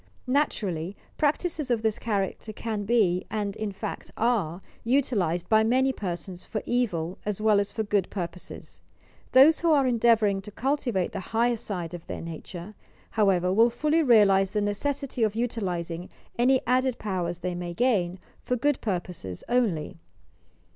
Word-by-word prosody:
Naturally, 205 - -1 0.2
practices 305 -1 0
of 230 -2 +1
this 220 -1 0
character 210 -1 -2
can 215 -1 -4
be, 195 -6 +2
and, 205 -2 -2
in 215 -2 -3
fact, 195 - -6
are 210 -8 +1 0.2
utilized 220 - +1
by 220 0 +4
many 260 +4 +2
persons 180 -3 -5
for 215 - -4
evil 185 -9 -1
as 210 -1 -3
well 215 -1 +4
at 200 - 0
for 220 +2 -3
good 205 -3 0
purposes. 175 -2 -7 0.5
Those 280 +5 +7
who 335 -1 +2
are 285 -3 +4
endeavouring 225 -5 +3
to 195 - -9
cul 265 +7 0
tivate 230 -11 -2
the 200 - -4 0.2
higher 240 +1 +3 0.2
aide 175 -4 -3
of 175 -1 -8
their - - -5
nature, 170 +4 -8 0.4
however, 185 -4 +2
will 225 +4 +5
fully 300 +7 +1
realize 205 -8 +5
the 210 - -1
necessity 260 +6 -2
of 215 -2 +2
utilizing 180 -7 -3 0.3
any 255 +2 +3
added 255 0 +2
powers 175 -4 -3
they 180 0 -2
may 175 -1 -5
gain 195 -7 +1 0.3
for 250 - 0
good 285 +3 +1
purposes 175 - -4
only. 210 - 0
210 Hz, 155 wpm, -27 LUFS, 180-245 Hz, 0.5 s, Those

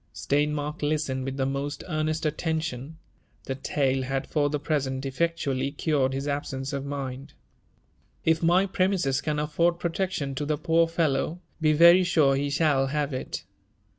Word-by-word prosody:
Steinmark 150 +2 -1
listened 145 -3 -1
with 135 0 -4
the 135 - +1
most 140 +2 -3
earnest 155 -1 -1
attention; 160 -2 -2 0.5
the 135 - -3
tale 135 0 0
had 135 +1 -2
for 145 -2 +1
the 150 - -1
present 140 -3 -1
effectually 140 -2 -1
cured 145 -3 +1
his 135 +2 -3
absence 140 -1 -3
of 140 -1 -2
mind. 140 -1 -5 0.5
" - - -39
If 160 0 +3
my 175 +3 +4
premises 185 -8 +1
can 150 0 -1
afford 170 +3 +1
protection 170 -5 -2
to 145 +2 -3
the 150 -1 0
poor 165 +2 +3
fellow, 165 0 0 0.2
be 155 -1 +4
very 170 +4 +7
sure 155 -6 +3
he 140 +1 -1
shall 140 -2 +2
have 145 0 -1
it. 130 - -4
145 Hz, 160 wpm, -26 LUFS, 135-160 Hz, 0.5 s, very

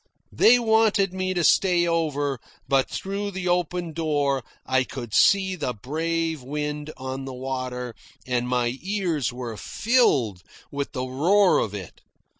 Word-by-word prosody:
They 245 - +6
wanted 220 -4 +3
me 185 0 -2
to 175 - +1
stay 175 +1 +4
over, 145 -5 0 0.3
but 135 -1 +2
through 200 +1 -3
the 190 -2 -4
open 175 -1 -1
door 145 -5 0 0.2
I 130 0 +2
could 120 -4 -8
see 190 -1 +4
the 130 -8 -3
brave 160 +5 -2
wind 150 +2 -4
on 130 0 -5
the 135 -1 -6
water, 125 -2 -4 0.3
and 125 -1 -1
my 125 0 0
ears 180 - -1
were 120 -3 -6
filled 140 - +1 0.3
with 140 0 -4
the 130 -2 -2
roar 175 +10 +3
of 105 -2 -2
it. 95 -4 -9
150 Hz, 145 wpm, -24 LUFS, 130-180 Hz, 0.3 s, They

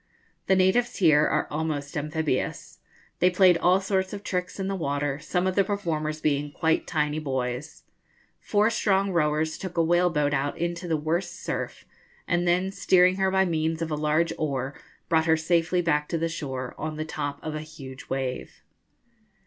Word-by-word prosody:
The 190 - +4
natives 190 +6 +2
here 155 -5 +4
are - - +1
almost 150 -2 -3
amphibious. 150 -2 -2 0.4
They 180 - +5
played 180 -2 +5
all 180 +2 +4
sorts 190 -1 -1
of 205 0 -6
tricks 180 +1 -3
in 190 - -2
the 195 - -1
water, 145 -4 -1
some 180 +4 -1
of 185 - +1
the 195 - +3
performers 155 -6 -2
being 145 -1 0
quite 160 +1 0
tiny 150 -2 0
boys. 130 0 -4 0.6
Four 210 +2 +2
strong 195 -3 +1
rowers 155 -1 0
took 180 -2 -6
a 165 - +4
whale 175 +2 +3
boat 150 -3 0
out 140 +1 -1
into 170 +1 -3
the 160 -2 +1
worst 170 +4 -2
surf, - - -4 0.4
and 175 0 +1
then, 180 +2 +2
steering 185 -1 +4
her 190 0 +2
by 190 0 +3
means 160 -1 -1
of 160 - -4
a - - +1
large 155 +2 +1
oar, 135 -3 -2 0.3
brought 160 0 +2
her 160 0 +4
safely 170 +2 +1
back 150 -3 +1
to 170 - 0
the 165 +1 0
shore 130 -6 -5
on 155 0 -3
the 155 - -3
top 145 -3 -4
of 155 - -4
a 155 - -4
huge 135 -5 -10
wave. 130 -1 -4
160 Hz, 180 wpm, -26 LUFS, 150-180 Hz, 0.6 s, They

